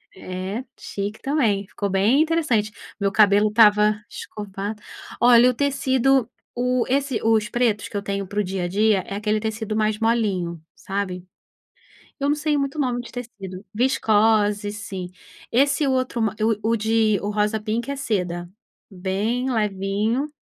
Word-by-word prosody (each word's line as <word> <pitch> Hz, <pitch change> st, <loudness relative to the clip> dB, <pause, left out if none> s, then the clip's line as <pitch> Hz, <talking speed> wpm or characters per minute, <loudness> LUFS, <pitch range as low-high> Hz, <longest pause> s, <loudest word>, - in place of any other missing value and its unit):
É, 190 Hz, +5 st, -5 dB
chique 205 Hz, +2 st, -5 dB
também, 225 Hz, -9 st, +1 dB
ficou 200 Hz, -1 st, -3 dB
bem 205 Hz, +9 st, +3 dB
interessante, 305 Hz, -10 st, +1 dB, 0.3 s
meu 200 Hz, -1 st, +1 dB
cabelo 205 Hz, 0 st, +5 dB
estava 210 Hz, -1 st, +5 dB
escovado. 205 Hz, 0 st, -6 dB, 0.4 s
Olha 245 Hz, 0 st, +7 dB
o 250 Hz, -, +1 dB
tecido, 265 Hz, -2 st, +2 dB, 0.3 s
o 250 Hz, 0 st, +1 dB
esse 270 Hz, -2 st, 0 dB
os 220 Hz, -1 st, +2 dB
pretos 235 Hz, -4 st, 0 dB
que -, -, -12 dB
eu 200 Hz, -, -2 dB
tenho 200 Hz, -1 st, -3 dB
para 205 Hz, +2 st, -3 dB
o -, -, +2 dB
dia 190 Hz, -1 st, -3 dB
a 175 Hz, -, -1 dB
dia, 210 Hz, +2 st, +2 dB
é 200 Hz, -, -5 dB
aquele 215 Hz, +1 st, 0 dB
tecido 220 Hz, 0 st, -3 dB
mais 215 Hz, -1 st, +1 dB
molinho, 200 Hz, -8 st, 0 dB
sabe? 190 Hz, -2 st, -4 dB, 1.0 s
Eu 280 Hz, -, +1 dB
não 290 Hz, -, +3 dB
sei 300 Hz, 0 st, 0 dB
muito 275 Hz, +2 st, -2 dB
o -, -, -1 dB
nome 250 Hz, -3 st, 0 dB
de 240 Hz, -, -9 dB
tecido, 205 Hz, -6 st, -8 dB
viscose 210 Hz, -3 st, +2 dB
sim, 190 Hz, -3 st, -6 dB, 0.4 s
esse 280 Hz, +4 st, +3 dB
outro 255 Hz, -3 st, 0 dB
ma 215 Hz, -1 st, 0 dB, 0.3 s
o 220 Hz, -, 0 dB
o 230 Hz, -, +3 dB
de 220 Hz, -1 st, +2 dB
o 205 Hz, -, -2 dB
rosa 210 Hz, +1 st, 0 dB
pink 230 Hz, +5 st, -2 dB
é 280 Hz, -, -3 dB
seda, 180 Hz, -9 st, -2 dB, 0.4 s
bem 205 Hz, +7 st, -2 dB
levinho. 210 Hz, +4 st, 0 dB
215 Hz, 160 wpm, -23 LUFS, 200-245 Hz, 1.0 s, Olha